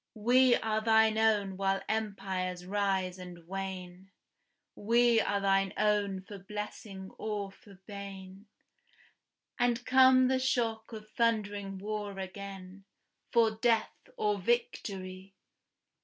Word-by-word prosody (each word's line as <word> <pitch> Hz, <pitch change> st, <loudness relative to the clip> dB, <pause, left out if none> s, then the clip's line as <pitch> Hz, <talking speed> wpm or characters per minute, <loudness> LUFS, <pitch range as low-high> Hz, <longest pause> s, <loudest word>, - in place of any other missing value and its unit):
We 245 Hz, +3 st, +5 dB
are 220 Hz, 0 st, -1 dB
thine 220 Hz, 0 st, +4 dB
own 205 Hz, -4 st, +2 dB
while 195 Hz, 0 st, +1 dB
empires 190 Hz, -4 st, -3 dB
rise 190 Hz, -2 st, -1 dB
and 175 Hz, -2 st, -10 dB
wane, 190 Hz, -1 st, -6 dB, 0.6 s
We 235 Hz, +2 st, +3 dB
are 200 Hz, -, 0 dB
thine 195 Hz, -1 st, +2 dB
own 205 Hz, -2 st, +1 dB
for 200 Hz, +1 st, -10 dB
blessing 195 Hz, -1 st, -7 dB
or 205 Hz, -2 st, -3 dB
for 200 Hz, 0 st, -17 dB
bane, 195 Hz, -1 st, -9 dB, 1.1 s
And, 245 Hz, 0 st, +1 dB
come 260 Hz, 0 st, +6 dB
the 260 Hz, 0 st, +2 dB
shock 230 Hz, -4 st, -1 dB
of 215 Hz, -1 st, -9 dB
thundering 205 Hz, -4 st, -1 dB
war 205 Hz, 0 st, -4 dB
again, 195 Hz, 0 st, -8 dB, 0.5 s
For 230 Hz, -2 st, +4 dB
death 225 Hz, 0 st, +1 dB, 0.2 s
or 210 Hz, -1 st, 0 dB
victory! 195 Hz, -3 st, -2 dB
205 Hz, 110 wpm, -31 LUFS, 195-220 Hz, 1.1 s, come